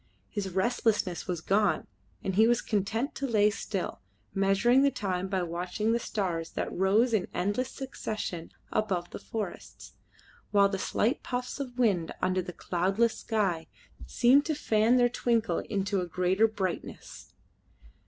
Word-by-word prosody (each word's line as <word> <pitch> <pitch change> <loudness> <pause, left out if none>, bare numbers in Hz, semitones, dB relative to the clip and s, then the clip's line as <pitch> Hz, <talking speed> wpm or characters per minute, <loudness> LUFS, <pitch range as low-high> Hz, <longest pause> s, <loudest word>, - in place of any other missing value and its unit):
His 205 -3 -3
restlessness 195 -1 0
was 175 -3 -2
gone, 200 +3 +2 0.4
and 190 - -1
he 220 +4 +5
was 240 0 +3
content 220 +5 -1
to 275 - -3
lay 210 -3 +4
still, 215 - -4 0.3
measuring 195 +6 +4
the 280 - +5
time 190 -7 -2
by 190 -1 -1
watching 180 +6 -2
the 235 - +2
stars 175 -8 -3
that - - -3
rose 210 +6 +3
in 205 -4 +1
endless 205 +8 0
succession 215 -11 -5 0.2
above 185 -5 -1
the - - -6
forests, 210 -5 -6 0.6
while 200 -1 +4
the 195 -1 -3
slight 235 +8 0
puffs 250 +2 -4
of 255 -3 -5
wind 200 -9 +1
under 185 0 +1
the 180 0 -6
cloudless 195 +7 0
sky 195 -8 -1 0.4
seemed 260 +4 +5
to 315 - 0
fan 225 -3 +3
their 245 -1 +5
twinkle 235 -2 0
into 200 -1 -1
a 180 - -3
greater 185 +5 +2
brightness. 195 -5 -5
205 Hz, 150 wpm, -29 LUFS, 185-235 Hz, 0.6 s, he